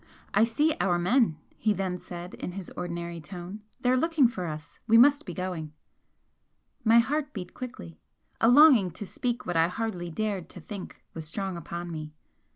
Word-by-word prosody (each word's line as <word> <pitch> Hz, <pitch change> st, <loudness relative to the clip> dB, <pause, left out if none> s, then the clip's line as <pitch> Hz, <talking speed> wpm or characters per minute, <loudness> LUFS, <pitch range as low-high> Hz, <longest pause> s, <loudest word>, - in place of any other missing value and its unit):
"I 215 Hz, +3 st, +5 dB
see 295 Hz, +7 st, +1 dB
our 180 Hz, -3 st, +2 dB
men," 185 Hz, -, +3 dB, 0.2 s
he 215 Hz, -1 st, +2 dB
then 190 Hz, -2 st, -2 dB
said, 175 Hz, +1 st, -8 dB
in 180 Hz, -, -6 dB
his 190 Hz, -2 st, -7 dB
ordinary 170 Hz, -1 st, -4 dB
tone, 180 Hz, +4 st, -8 dB, 0.2 s
"They 250 Hz, -, +3 dB
are -, -, +4 dB
looking 310 Hz, -1 st, +4 dB
for 195 Hz, -7 st, -4 dB
us. 155 Hz, -1 st, -8 dB
We 225 Hz, 0 st, +6 dB
must 285 Hz, +5 st, +6 dB
be -, -, -4 dB
going." 180 Hz, -5 st, -4 dB, 1.1 s
My 225 Hz, +1 st, +6 dB
heart 290 Hz, +5 st, +1 dB
beat 180 Hz, -4 st, -7 dB
quickly. 85 Hz, -, -8 dB, 0.4 s
A 225 Hz, -, +4 dB
longing 255 Hz, -, +7 dB
to 205 Hz, -, -6 dB
speak 245 Hz, +5 st, -3 dB
what 175 Hz, -, -2 dB
I 165 Hz, 0 st, +5 dB
hardly 180 Hz, -2 st, -3 dB
dared 200 Hz, 0 st, -2 dB
to -, -, -9 dB
think, 195 Hz, +3 st, -9 dB
was 160 Hz, -1 st, -5 dB
strong 190 Hz, +2 st, -3 dB
upon 170 Hz, +1 st, -6 dB
me. 155 Hz, -1 st, -6 dB
190 Hz, 180 wpm, -28 LUFS, 175-235 Hz, 1.1 s, longing